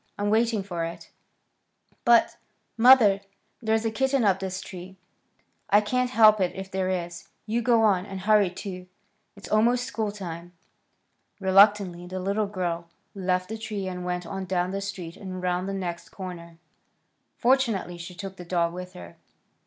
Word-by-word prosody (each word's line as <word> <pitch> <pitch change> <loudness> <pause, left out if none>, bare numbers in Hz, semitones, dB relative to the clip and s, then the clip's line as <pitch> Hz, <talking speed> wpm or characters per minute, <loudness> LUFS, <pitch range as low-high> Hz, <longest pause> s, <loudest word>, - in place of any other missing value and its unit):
I'm 205 0 0
waiting 225 -2 +2
for 175 -4 -4
it." 165 +1 -7 0.9
"But, 235 -1 +4 0.4
mother, 225 -5 +6 0.4
there's 220 0 +1
a 225 - 0
kitten 265 +2 +1
up 195 -3 +3
this 190 -1 -4
tree." 190 0 -10 0.7
"I 205 - +6
can't 250 +4 0
help 215 -4 +6
it 180 - 0
if 190 0 -7
there 190 -1 -1
is. 175 -1 -4 0.2
You 230 +2 -1
go 230 -1 +3
on, 195 -3 +2
and 195 -1 -6
hurry, 210 -1 +4
too. 180 0 -8 0.5
It's 200 - -11
almost 235 +3 +3
school 220 -3 -3
time." 175 -3 -8 0.9
Reluctantly 190 -2 +4
the 185 +1 -5
little 200 +3 -1
girl 175 -4 -3 0.2
left 185 -1 -1
the 220 0 -5
tree 210 -3 -4
and 180 -1 -5
went 180 0 -3
on 190 +2 -5
down 180 0 -1
the 195 +1 -3
street 190 -4 -6
and 190 -2 -7
around 180 0 -1
the - - -2
next 180 -3 -5
corner. 170 -3 -9 0.8
Fortunately 235 -9 +1
she 175 +1 -8
took 195 +1 -7
the 180 - -8
dog 170 -1 0
with 180 0 -8
her. 85 -1 -11
190 Hz, 165 wpm, -26 LUFS, 180-215 Hz, 0.9 s, mother